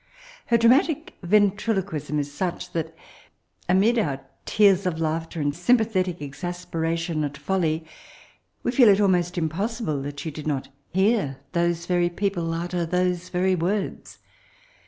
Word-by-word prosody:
Her 235 - +4
dramatic 280 +8 +3
ventriloquism 195 -5 +1
is 145 -1 -2
sneh 180 +3 -3
that, 160 -1 -3 0.7
amid 210 +6 +4
our 140 -9 -2 0.2
tears 200 -3 +4
of 175 - 0
laugk 160 0 -2
ter 165 - -5
and 145 0 0
sympathetic 185 -4 +1
exasperation 165 +1 -3
at 145 -1 -3
foIly» 165 -2 -1 0.8
we - - +1
feel 245 -3 +6
it 200 0 +5
almost 180 -3 +2
impossible 170 - -2
that 145 +1 -6
she 160 - -4
did 150 +1 -7
not 140 -3 -2 0.2
hear 190 - +1
those 170 0 0
very 175 -1 +2
peo> 195 +3 -1
pie 165 -2 -2
utter 175 0 -2
those 180 +1 0
very 185 +1 +1
words. 185 +3 -2
175 Hz, 140 wpm, -24 LUFS, 160-200 Hz, 0.8 s, feel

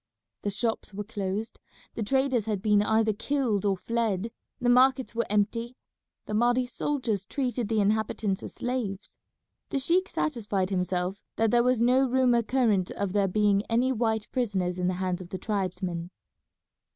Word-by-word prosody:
The 205 - -1
shops 215 0 -2
were 210 - -3
closed, 205 0 -4 0.3
the - - -5
traders 260 -1 +1
had 210 -3 0
been 210 -2 +4
either 220 +1 +2
killed 230 -3 -1
or 195 -2 +2
fled, 225 +1 -1 0.3
the 245 - -1
markets 255 +1 +4
were 235 0 -1
empty; 230 +4 0 0.5
the - - -5
Mahdi's 245 +3 +2
soldiers 245 -9 -1
treated 245 -1 -2
the 220 -1 +1
inhabitants 210 -1 0
as - - -8
slaves. 235 -6 -4 0.5
The - - -1
sheik 350 +8 +2
satisfied 205 -9 -1
himself 180 +1 -1
that 225 -1 +2
there 240 - +5
was 250 -1 +2
no 255 +3 +4
rumour 250 -2 +3
current 220 -6 +1
of 200 -2 -3
there 200 -1 +3
being 205 +1 +3
any 240 +3 +2
white 220 -3 0
prisoners 190 -8 -1
in 180 - +1
the 185 - 0
hands 185 0 -2
of 175 - -10
the 190 - -4
tribesmen. 185 -4 -3
220 Hz, 165 wpm, -27 LUFS, 195-245 Hz, 0.5 s, there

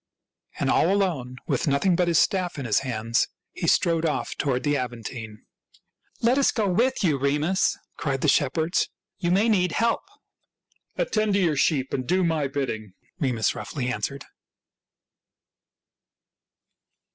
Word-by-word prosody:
And - - +1
all 175 - +3
alone, 165 -11 0
with - - -1
nothing 150 +6 +2
but 180 0 +1
his 170 -2 +3
staff 180 +2 +1
in 140 - -4
his 110 - +3
hands, 115 -3 0 0.2
he - - -4
strode 165 -1 +3
off 160 -2 -1
toward 130 -3 -1
the 145 -1 +1
Aventine. 115 -3 -6 0.4
" - - -38
Let 245 +4 +4
us 275 - +4
go 215 -3 0
with 235 +7 +1
you, 150 -7 +2
Remus," 150 +7 +1 0.2
cried 135 -4 -2
the - - +1
shepherds. 160 +6 +2
" - - -65
You 175 - 0
may 195 +5 +3
need 180 -6 +2
help." 230 +1 +1 0.5
" - - -45
Attend 215 - +1
to - - +3
your 170 -5 +2
sheep, 135 -1 +1
and 130 -2 -2
do 185 +1 +2
my 160 -4 +1
bidding," 110 -8 -4 0.3
Remus 125 -7 +1
roughly 125 -4 -4
answered. 125 +4 -3
150 Hz, 155 wpm, -25 LUFS, 130-185 Hz, 0.5 s, Let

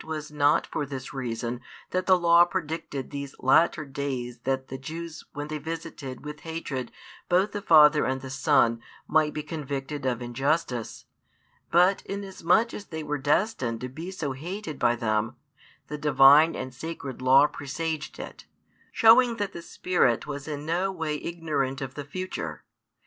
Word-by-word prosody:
was 155 -1 -5
not 145 -2 +3
for 150 - -3
this 135 -1 -6
reason 120 -2 -3 0.3
that 185 0 -1
the 185 -1 +6
Law 170 0 +6
predicted 160 -6 -4
these 140 -1 -6
latter 155 +4 +3
days 130 -3 -4
that 130 0 -1
the 130 - -6
Jews 160 +4 -7
when 145 +1 -5
they 155 0 -4
visited 155 -4 -7
with 150 0 -7
hatred 155 -7 -5 0.4
both 185 +3 +3
the 205 - -4
Father 155 -4 +6
and 130 0 -1
the 130 0 -8
Son 120 -3 +3 0.3
might 155 -1 +3
be 150 - -4
convicted 145 -2 -5
of 125 -3 0
injustice, 125 0 -2 0.6
but, 180 +3 +4
inasmuch 200 +2 +1
as 205 - -7
They 160 -1 -5
were 150 -1 -2
destined 145 - 0
to 130 - -4
be 160 +8 -7
so 165 -7 -3
hated 160 +3 -6
by 120 - +3
them, 115 0 -1 0.5
the 150 - -6
Divine 145 +2 +6
and 130 - -5
Sacred 140 -1 -7
Law 135 +2 +6
presaged 150 +2 -4
it, - - -9 0.4
showing 235 +1 +6
that 205 -2 -3
the 170 - -7
Spirit 165 -9 +1
was 145 -1 -6
in 150 -1 -5
no 175 +4 0
way 160 -4 -2
ignorant 150 -6 -2
of 135 -2 -5
the 145 - -6
future. 185 +6 -5
150 Hz, 160 wpm, -27 LUFS, 135-165 Hz, 0.6 s, the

